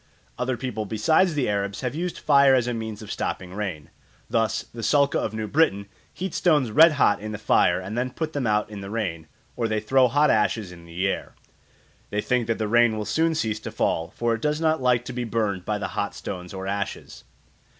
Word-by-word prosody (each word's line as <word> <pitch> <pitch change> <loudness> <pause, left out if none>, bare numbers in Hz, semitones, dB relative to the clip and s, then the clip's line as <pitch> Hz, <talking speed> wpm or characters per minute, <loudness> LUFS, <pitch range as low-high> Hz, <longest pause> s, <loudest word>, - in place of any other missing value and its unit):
Other 125 0 -2
people 110 -5 -4
besides 155 - +2
the 140 -4 0
Arabs 100 -1 -2
have 125 -1 -2
used 175 +3 -3
fire 140 -2 +5
as 125 -2 +2
a 125 - -1
means 110 -2 -5
of 105 - -8
stopping 90 -1 -4
rain. 95 -8 -5 0.4
Thus 115 -1 +1
the 115 - -10
Sulka 140 +3 +3
of 110 - -3
New 110 -1 -3
Britain 105 -9 +2 0.3
heat 185 -1 -5
stones 150 -9 +2
red 160 +7 +7
hot 135 -8 +3
in 110 0 -5
the - - -4
fire 90 -4 +3
and 95 +4 -6
then 125 +1 -1
put 155 +4 -4
them 140 -5 -1
out 105 0 +1
in 100 -1 -7
the 95 - -7
rain, 90 -8 -3 0.3
or 115 - -1
they 110 -1 0
throw 130 +4 +3
hot 145 +4 +3
ashes 105 -2 +1
in 85 -1 -13
the 85 +3 -2
air. - - -4 0.7
They 105 - -2
think 120 +1 0
that 115 - 0
the 110 - -1
rain 120 0 +4
will 105 - -3
soon 160 +5 +1
cease 110 -8 -1
to - - -6
fall, 80 +1 -1
for 120 -1 +1
it 115 - -3
does 150 +2 0
not 160 -2 +1
like 125 -1 +2
to 125 - -6
be 125 0 -3
burned 105 -5 -1
by 105 - -1
the 105 - -4
hot - - -3
stones 90 -1 -6
or 95 0 -6
ashes. 100 0 -4
110 Hz, 225 wpm, -24 LUFS, 105-130 Hz, 0.7 s, red